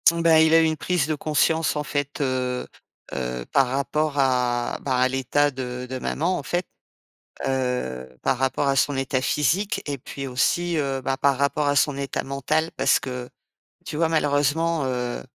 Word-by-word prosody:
Bah, 165 -1 +4
il 160 0 +4
a 165 - +7
eu - - +4
une 160 0 +1
prise 175 -3 0
de 155 - 0
conscience, 155 +2 +1
en 150 - -1
fait, 145 -1 -3
heu 130 -2 -1 0.5
heu, 60 -2 -3
par 135 -2 +4
rapport 140 +3 -1
à, 125 -3 +1
bah, 130 -2 0
à 125 +1 +4
l'état 135 +3 +1
de 125 -1 -5
de 130 0 -4
maman, 175 +8 -1
en - - -5
fait, 175 0 -1 0.8
heu, 125 - -1 0.2
par 130 - +1
rapport 135 +2 0
à 135 - +2
son 140 +1 +2
état 135 0 0
physique 190 - +1
et 145 -2 -3
puis 140 +1 -7
aussi, 170 +7 +1
heu, 135 -3 -1
bah, 135 +1 -1
par 140 0 +2
rapport 140 +1 +1
à 145 - +2
son 145 0 +2
état 140 0 -3
mental 150 +4 -1
parce - - +3
que 125 -1 -5 0.6
tu 150 - -5
vois 165 0 +2
malheureusement, 155 +1 +1
heu 125 -1 -2
140 Hz, 185 wpm, -24 LUFS, 130-155 Hz, 0.8 s, a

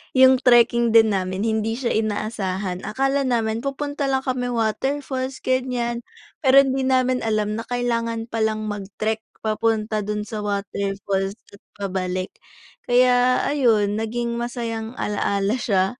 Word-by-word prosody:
'yung 260 0 +7
trekking 235 -2 +4
din 220 -1 +7
namin, 185 +1 -1
hindi 220 0 0
siya 245 0 -2
inaasahan, 205 -4 -2
akala 270 +3 0
namin 225 -2 0
pupunta 285 +2 -3
lang 265 -1 0
kami 255 -1 -1
waterfalls 260 +3 -2
ganiyan, 250 -2 -1 0.4
pero 275 -1 +6
hindi 265 -1 -1
namin 255 -1 +2
alam 215 -1 -1
na - - -4
kailangan 230 -2 -1
palang 220 -1 0
mag-trek 210 +2 -3 0.2
papunta 215 0 0
do'n 210 0 -3
sa 215 0 -6
waterfalls 200 -1 -2 0.2
at 200 - -15
pabalik. 185 -2 -3 0.6
Kaya 250 0 +4
ayun 220 -7 +2
naging 235 +1 -2
masayang 235 -1 -4
ala-ala 200 0 0
siya 195 +2 0
225 Hz, 130 wpm, -22 LUFS, 210-250 Hz, 0.6 s, yung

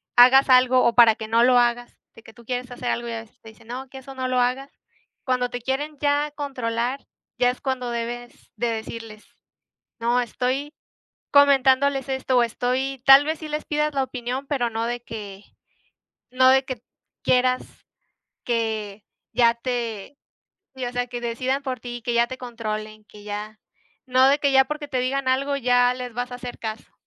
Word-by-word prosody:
hagas 255 +3 +7
algo, 255 0 +5
o 235 - +3
para 230 -2 +7
que 220 - -7
no 230 +1 +3
lo 250 0 +5
hagas 240 0 0 0.2
de 225 - -15
que 225 - -15
tú 235 -2 -17
quieres 250 0 -3
hacer 245 0 -5
algo, 240 0 -3
ya 230 -1 -4
ves 225 - -17
que - - -39
te 225 - -12
dicen 220 +1 -19
"No, 255 +2 -7
que 265 - -11
eso 270 +1 -11
no 260 -1 -2
lo 255 0 +1
hagas". 255 +3 0 0.5
Cuando 250 -1 0
te 245 -1 -6
quieren 290 +4 -3
ya 290 0 +1
controlar, 255 -3 -3 0.4
ya 245 0 +4
es 250 - -5
cuando 260 -3 -2
debes 240 +1 -6
de 240 - -1
decirles: 225 -1 -6 0.8
"No, 240 +2 +2
estoy 260 +5 -2 0.6
comentándoles 275 -1 +4
esto 265 -1 0
o 240 - +5
estoy", 255 +3 -2
tal 270 +1 +8
vez 315 +1 -2
sí 310 - -7
les 300 0 -4
pidas 300 0 -1
la 275 - +1
opinión, 255 +1 -5
pero 245 -5 0
no 225 +1 -2
de 240 0 -3
que 205 -4 -8 0.9
no 255 +1 +5
de 265 0 +4
que 255 -3 -6 0.4
quieras 255 0 +2 0.8
que 220 -3 -2 0.3
ya 235 -1 +4
te 235 0 -4 0.6
Si, 260 -1 -4
o 245 - -4
sea 245 0 -2
que 240 0 -6
decidan 255 +4 -2
por 260 -3 -4
ti, 240 +1 -6
y - - -12
que 240 +1 -2
ya 235 0 +3
te 260 +1 -7
controlen, 215 -3 -6
que 210 0 -15
ya 210 +1 -6 0.5
no 255 0 +4
de 280 +2 +4
que 280 -1 +2
ya 265 0 +5
porque 300 +1 -5
te 260 -3 -1
digan 265 +1 -1
algo, 275 +2 +1
ya 245 -1 +3
les 250 -1 -7
vas 245 +1 -3
a - - -4
hacer 245 0 -8
caso. 220 0 -7
250 Hz, 195 wpm, -23 LUFS, 235-265 Hz, 0.9 s, tal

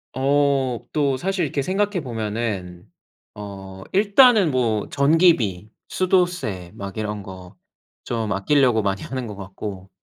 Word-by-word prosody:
어 135 -2 +1
또 140 -3 +1
사실 190 +5 -1
이렇게 140 -2 -1
생각해 195 +4 -1
보면은 105 - -4 0.5
어 95 -2 -9
일단은 205 - +5
뭐 115 -5 0
전기비, 140 - +3 0.2
수도세 175 - 0
막 100 +1 -7
이런 105 -1 -3
거 95 -2 -11 0.5
좀 115 -3 -3
아낄려고 120 +3 +3
많이 100 -1 -1
하는 130 -1 -5
것 105 - -7
같고. 95 0 -8
120 Hz, 240 characters per minute, -22 LUFS, 100-150 Hz, 0.5 s, 일단은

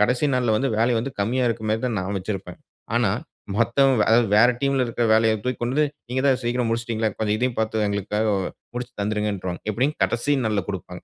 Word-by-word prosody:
கடைசி 125 +7 +2
நாள்ல 120 -3 +2
வந்து 135 +4 0
வேலை 120 +2 +3
வந்து 125 +5 -3
கம்மியா 125 +5 +1
இருக்கறமாரி 110 -1 -1
தான் 115 -4 -2
நான் 95 +2 -3
வச்சிருப்பேன். 95 -2 -6 0.4
ஆனா, - - +2 0.5
மத்தவங்க 120 +1 +3
அதாவது 115 +1 +5
வேற 115 +3 +7
டீம்‌ல 135 -2 +2
இருக்கிற 120 0 -1
வேலைய 110 0 +4
தூக்கி 125 -1 -2
கொண்டுபோய் 145 +4 +1 0.2
நீங்க 130 +1 0
தான் 130 -2 +3
சீக்கிரம் 120 0 0
முடிச்சிட்டீங்களே! 115 -1 -1
இப்ப 110 - -3
இதையும் 125 +1 -1
பார்த்து 110 -1 0
எங்களுக்காக 100 +2 -1 0.5
முடிச்சு 125 0 -5
தந்துருங்கன்ருவாங்க. 100 -4 -2
எப்டி 125 +7 +1 0.2
கடைசி 145 +5 0
நாள்ல 105 -3 0
குடுப்பாங்க. 90 -2 -6
115 Hz, 180 wpm, -23 LUFS, 105-125 Hz, 0.5 s, வேற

